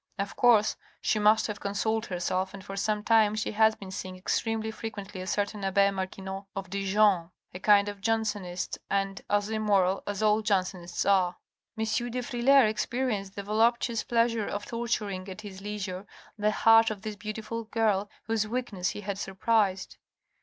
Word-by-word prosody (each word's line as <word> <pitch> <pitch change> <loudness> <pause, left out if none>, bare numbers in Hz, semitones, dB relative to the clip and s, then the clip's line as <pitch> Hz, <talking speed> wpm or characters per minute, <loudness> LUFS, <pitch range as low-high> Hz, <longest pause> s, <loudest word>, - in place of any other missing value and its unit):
Of 200 0 -3
course 230 -4 +4 0.2
she 215 - +1
must 210 +1 +4
have 210 -2 -4
consoled 220 +3 -1
herself 185 +1 -2
and 195 -1 -11
for 195 - -6
some 210 +1 -1
time 220 -2 +4
she 215 - -2
has 220 0 +4
been 195 -3 -10
seeing 185 -1 -6
extremely 220 +3 -1
frequently 205 -3 -7
a 185 - -6
certain 205 +1 -1
abbe 200 +1 +3
Marquinot 190 0 -5
of 195 -2 -6
Dijon, 195 -3 +2 0.2
a 180 - -6
kind 205 +1 +5
of 205 -1 -6
Jansenist, 205 -5 -2
and 195 0 -1
as 205 +1 +1
immoral 200 -3 +2
as 205 +1 -2
all 215 0 +4
Jansenists 185 -4 -1
are." 185 -3 +3 0.4
M. 220 - -1
de 240 +3 -1
Frilair 255 +2 +4
experienced 215 -3 -2
the 200 - -5
voluptuous 230 +2 +2
pleasure 230 -2 +1
of 205 0 -4
tor 235 0 -4
turing 200 -4 -2
at 190 +3 -8
his 195 -2 -9
leisure 200 -2 -5 0.3
the 210 -1 +1
heart 225 +1 +5
of 215 -2 -6
this 215 -1 -4
beautiful 220 +2 -5
girl 210 -3 +1
whose 225 -1 0
weakness 215 -6 -2
he - - -6
had 200 -1 -4
surprised. 195 0 0
205 Hz, 170 wpm, -28 LUFS, 195-220 Hz, 0.4 s, kind